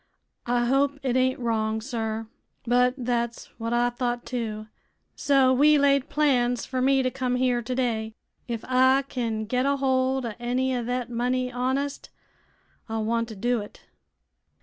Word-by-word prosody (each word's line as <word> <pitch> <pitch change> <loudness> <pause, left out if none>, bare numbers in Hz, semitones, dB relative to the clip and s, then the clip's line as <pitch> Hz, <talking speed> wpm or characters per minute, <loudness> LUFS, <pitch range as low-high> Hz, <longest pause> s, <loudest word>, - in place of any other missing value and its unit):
I 240 0 +2
hope 275 +3 +2
it 255 -2 0
ain't 260 0 +2
wrong, 220 -2 -1
sir; 225 -2 -3 0.4
but 250 +1 +3
thet's 235 -2 -2
what 230 0 -3
I 240 0 +2
thought, 240 0 -2
too. 220 -4 -4 0.5
So 270 -2 +3
we 295 +3 +5
laid 280 0 +3
plans 250 -5 +1
fer 255 -1 -2
me 270 0 +3
to 255 - 0
come 255 -1 -1
here 250 -1 +1
today. 230 -3 -2 0.3
Ef 230 -2 -3
I 260 +1 +4
kin 225 -4 -2
get 250 +4 0
a 280 0 +2
hold 260 -1 +1
o' 230 - -4
any 255 +2 0
o' 245 - -2
thet 245 0 -3
money 250 +1 -1
honest, 265 +3 -2 0.8
I 225 - -2
want 230 +1 0
to 220 - -8
do 240 +4 0
it." 205 - -11
250 Hz, 160 wpm, -25 LUFS, 235-260 Hz, 0.8 s, we